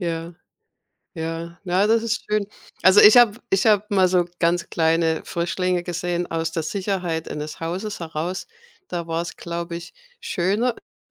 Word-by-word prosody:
Ja, 170 -1 -3 0.8
ja, 165 +1 -5
na, 185 +2 +2
das 225 +1 +3
ist 230 +1 -2
schön. 210 -1 0 0.4
Also, 190 +2 +7
ich 215 +4 +9
habe 230 -2 +5
ich 195 +3 +2
habe 210 -2 +4
mal 190 -2 +4
so 180 -1 +3
ganz 170 0 +1
kleine 160 0 +2
Frischlinge 175 +1 -1
gesehen 175 0 -3
aus 165 0 -1
der 165 - -2
Sicherheit 180 -1 -2
eines 150 0 -6
Hauses 185 +6 -4
heraus. 165 +3 -4 0.4
Da 170 -1 -4
war's, 165 +1 -3
glaube 170 0 -5
ich, 170 - -9 0.3
schöner, 205 - 0
äh, 245 - -14
175 Hz, 155 wpm, -23 LUFS, 165-195 Hz, 0.8 s, ich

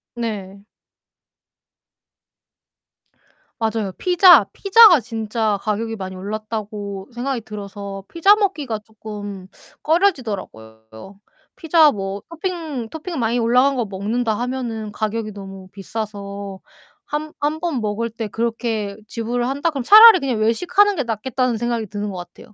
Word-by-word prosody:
네. 200 -4 -5 3.0
맞아요. 220 -3 -1
피자, 355 - +6
피자가 395 - +7
진짜 220 -1 -2
가격이 225 +1 -2
많이 190 -1 -6
올랐다고 205 0 -6
생각이 245 +1 -3
들어서 200 -2 -8
피자 365 +5 +4
먹기가 300 - -1
쪼끔 205 -3 -8 0.4
꺼려지더라고요. 195 - -2 0.4
피자 320 -2 +4
뭐 195 -2 -5
토핑, 330 - -4
토핑 320 +1 -6
많이 230 0 0
올라간 250 +4 +3
거 245 - 0
먹는다 215 +3 -2
하면은 240 -4 -4
가격이 215 0 -3
너무 195 -1 -10
비싸서 200 -1 -6 0.4
한 300 +1 -5
한 300 +2 -1
번 320 -7 -2
먹을 215 +2 -2
때 225 -1 -6
그렇게 225 -2 -2
지불을 240 +1 -2
한다 285 +5 -1
그러면 275 -4 -4
차라리 430 - +9
그냥 260 -6 -2
외식하는 360 - +2
게 290 - -1
낫겠다는 240 +1 -1
생각이 235 -1 -2
드는 205 +1 -4
것 - - -8
같아요. 175 +4 -12
225 Hz, 285 characters per minute, -20 LUFS, 205-275 Hz, 3.0 s, 차라리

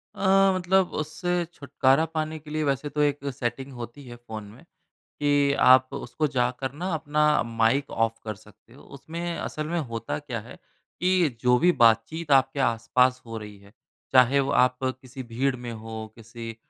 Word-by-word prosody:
अ, 195 0 +4
मतलब 185 0 +2
उससे 175 +3 -2
छुटकारा 140 0 +2
पाने 160 0 -3
के 150 0 -14
लिए 155 0 -1
वैसे 140 0 -1
तो 150 +1 -1
एक 145 -1 +1
सेटिंग 125 +3 -4
होती 120 +3 -9
है 120 - -9
फोन 110 -3 -8
में, 110 +8 -14 0.6
कि 145 -1 +3
आप 130 0 +6
उसको 155 +6 -2
जाकर 130 0 -1
ना 175 +6 -5
अपना 150 -1 +2
माइक 115 +4 +1
ऑफ 115 0 0
कर 110 -1 -4
सकते 110 +2 -21
हो। - - -15
उसमें 165 +5 -6
असल 155 0 -4
में 170 +2 -1
होता 115 -5 -4
क्या 130 -6 -5
है 115 - -12 0.4
कि 180 -2 +3
जो 125 0 +4
भी 175 +1 +4
बातचीत 115 +9 +3
आपके 135 +1 +3
आस-पास 125 +1 +2
हो 115 -1 -6
रही 105 -2 -10
है, 100 +1 -19 0.4
चाहे 130 +2 +5
वो 135 0 -1
आप 125 0 +3
किसी 130 0 -5
भीड़ 125 +3 -1
में 120 -1 -7
हो, 110 0 -7
किसी 115 0 -9
130 Hz, 175 wpm, -26 LUFS, 115-150 Hz, 0.6 s, आप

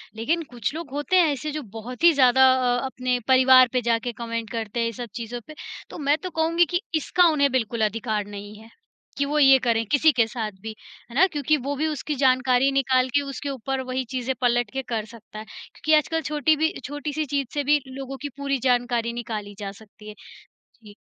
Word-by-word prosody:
लेकिन 325 +10 -1
कुछ 240 +2 -3
लोग 330 -4 -6
होते 290 +6 -1
हैं 335 -5 +5
ऐसे 295 +3 -5
जो 305 0 -4
बहुत 245 +7 -8
ही 340 - +8
ज़्यादा 265 -1 +5
अ, 245 0 0
अपने 255 -1 -2
परिवार 260 -1 +7
पे 250 - +1
जाके 235 +1 0
कमेंट 230 -1 -4
करते 225 0 -4
हैं 230 - +1
ये 230 - -2
सब 240 +1 -7
चीज़ों 240 +1 -6
पे। 310 - -11 0.3
तो - - -9
मैं 290 0 +1
तो 365 - -3
कहूँगी 335 +1 +2
कि 350 +4 -2
इसका 355 +4 +2
उन्हें 280 -3 +2
बिल्कुल 230 -3 -1
अधिकार 215 -1 -2
नहीं 205 +1 -9
है, 225 +1 -15 0.5
कि 280 - +1
वो 300 +1 0
ये 270 -1 +7
करें 225 -1 +2
किसी 305 +2 +5
के 230 -4 +2
साथ 225 -3 -4
भी। 220 0 -7 0.3
है 235 - -12
ना? 370 +6 +6
क्योंकि 300 -1 0
वो 280 +2 -4
भी 310 +3 -1
उसकी 300 0 -3
जानकारी 255 0 +3
निकाल 260 -1 +2
के 285 - +4
उसके 280 0 -6
ऊपर 270 0 -3
वहीं 260 0 -2
चीज़ें 260 0 -2
पलट 240 -2 +1
के 265 - -2
कर 220 -1 -1
सकता 220 -1 -12
है, 215 - -8
क्योंकि 310 +7 -4
आजकल 325 +2 -1
छोटी 305 +1 +1
भी 320 +1 0
छोटी-सी 290 +2 -4
चीज़ 280 -2 -2
से 290 -1 -1
भी 295 +1 +3
लोगों 270 +1 -7
की 290 - -4
पूरी 275 -1 -1
जानकारी 240 -1 0
निकाली 215 -4 -6
जा 200 -1 -5
सकती 210 +1 -15
है। 210 - -10 0.7
जी। 205 -1 -14
260 Hz, 215 wpm, -24 LUFS, 230-290 Hz, 0.7 s, ही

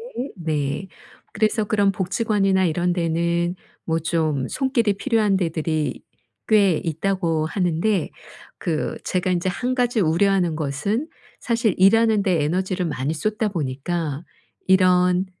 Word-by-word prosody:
거리에 260 +3 -4
네. 155 +2 -2 0.5
그래서 215 0 +1
그런 205 -1 +2
복지관이나 195 0 +1
이런 175 +1 0
데는 170 +1 0 0.3
뭐 165 0 0
좀 155 -4 -1
손길이 255 -6 +1
필요한 210 -2 +1
데들이 160 -5 -2 0.5
꽤 200 -6 +4
있다고 165 -1 -1
하는데 180 +1 0 0.5
그 160 -4 -2
제가 185 0 -1
인제 180 +1 0
1 250 +7 -2
가지 245 -3 +1
우려하는 175 0 +2
것은 155 - -2 0.3
사실 230 -4 0
일하는 220 +2 +4
데 175 -6 +1
에너지를 185 +4 -1
많이 145 0 -2
쏟다 215 +6 -1
보니까 155 0 -3 0.4
이런 180 -1 +4
180 Hz, 265 characters per minute, -22 LUFS, 160-205 Hz, 0.5 s, 꽤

